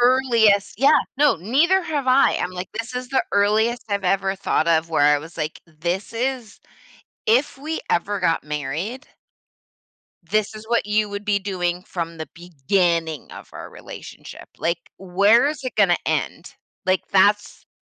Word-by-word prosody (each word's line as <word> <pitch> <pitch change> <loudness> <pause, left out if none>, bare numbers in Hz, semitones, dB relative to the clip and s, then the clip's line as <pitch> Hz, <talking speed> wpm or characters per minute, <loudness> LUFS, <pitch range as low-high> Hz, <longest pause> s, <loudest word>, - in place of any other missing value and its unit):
earliest 235 -6 +3
Yeah, 280 +3 +5 0.2
no, 295 -1 +4
neither 295 - +2
have 295 -5 -3
I, 260 +2 +4
I'm 180 - -2
like, 180 0 -6
this 230 +3 -5
is 250 0 -5
the 270 - +2
earliest 215 +4 +2
I've 200 -1 -1
ever 195 +1 +1
thought 190 -4 0
of 165 0 +2
where 155 -3 +2
I - - +1
was 160 +3 -12
like, 155 -1 -4
"This 170 +7 -4
is 250 -2 -3 0.6
if 250 +6 +2
we 310 +4 -4
ever 200 +4 0
got 165 -3 +1
married" 150 - -4 1.2
"this 215 +5 -1
is 215 0 -10
what 230 -2 0
you 210 0 +1
would 205 +1 -6
be 205 -1 +2
doing 180 -3 -2
from 170 -2 -5
the 160 - -5
beginning 170 -1 -1
of - - -11
our - - -8
relationship. - - -11
Like, 170 +1 -3
where 200 +7 +3
is 295 -2 -3
it 255 - -5
gonna - - +4
end?" - - -2 0.3
Like, 185 0 +2
that's 205 +2 +2
200 Hz, 160 wpm, -22 LUFS, 175-240 Hz, 1.2 s, Yeah